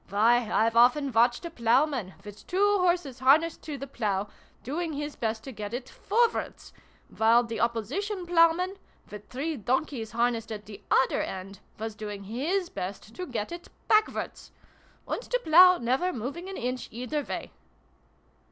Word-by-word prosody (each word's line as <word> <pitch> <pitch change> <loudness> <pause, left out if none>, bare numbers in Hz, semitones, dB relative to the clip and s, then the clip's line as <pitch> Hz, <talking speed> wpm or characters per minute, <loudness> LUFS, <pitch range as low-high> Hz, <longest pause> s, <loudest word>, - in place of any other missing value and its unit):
Why, 225 +3 +3
I've 225 +1 +2
often 255 +4 +4
watched 240 +6 +3
a 340 - -5
ploughman, 240 - +1
with 205 0 -11
two 405 +2 +3
horses 345 -8 0
harnessed 300 +6 +4
to 300 -2 -5
the 275 - -6
plough, 210 -6 -2 0.3
doing 320 +5 -3
his 295 +1 -4
best 220 -1 -2
to 270 - -7
get 210 -1 -5
it 250 0 -6
forwards; 470 0 -1 0.4
while 230 +2 +5
the 230 -1 -5
opposition 290 - -2
ploughman, 350 +2 +3 0.3
with 210 0 -10
three 305 +5 -3
donkeys 245 0 -1
harnessed 235 -1 0
at 210 -1 -6
the 205 -1 -11
other 265 - +3
end, 190 +1 -6 0.2
was 220 +1 -4
doing 210 -2 -7
his 300 - -1
best 200 +4 -6
to 365 - -5
get 225 -1 -4
it 345 0 -8 0.2
backwards! 430 0 +1 0.6
And - - -2
the - - -1
plough 360 -3 +7
never 260 +10 0
moving 285 - -5
an 390 - -6
inch, 250 +1 -3
either 250 +6 -3
way - - -6
250 Hz, 160 wpm, -28 LUFS, 225-335 Hz, 0.6 s, plough